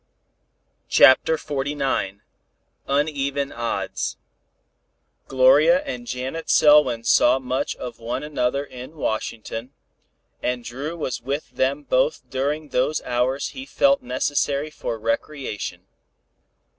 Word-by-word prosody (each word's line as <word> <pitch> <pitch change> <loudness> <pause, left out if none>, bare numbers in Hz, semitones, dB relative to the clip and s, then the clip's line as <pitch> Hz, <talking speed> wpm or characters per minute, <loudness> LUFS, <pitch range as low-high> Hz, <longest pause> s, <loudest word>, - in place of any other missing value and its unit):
CHAPTER 145 +5 +6
XLIX 135 -9 -2 0.7
UNEVEN 140 -1 0
ODDS 120 0 -3 1.1
Gloria 145 - +5
and 245 -4 -6
Janet 130 - -4
Selwyn 145 -6 +5
saw 120 +2 +5
much 130 0 -2
of 120 -2 -8
one 120 +4 -4
another 140 -2 -1
in 130 +2 -10
Washington, 115 -1 -4 0.7
and 125 -1 -2
Dru 140 +8 -5
was 130 -6 -3
with 140 +5 -4
them 140 +3 0
both - - 0
during 145 +3 -2
those 150 +5 0
hours 125 +2 0
he 265 0 -9
felt 275 0 +3
necessary 145 - -1
for 115 -6 -4
recreation. 115 +1 -3
135 Hz, 105 wpm, -23 LUFS, 125-150 Hz, 1.1 s, CHAPTER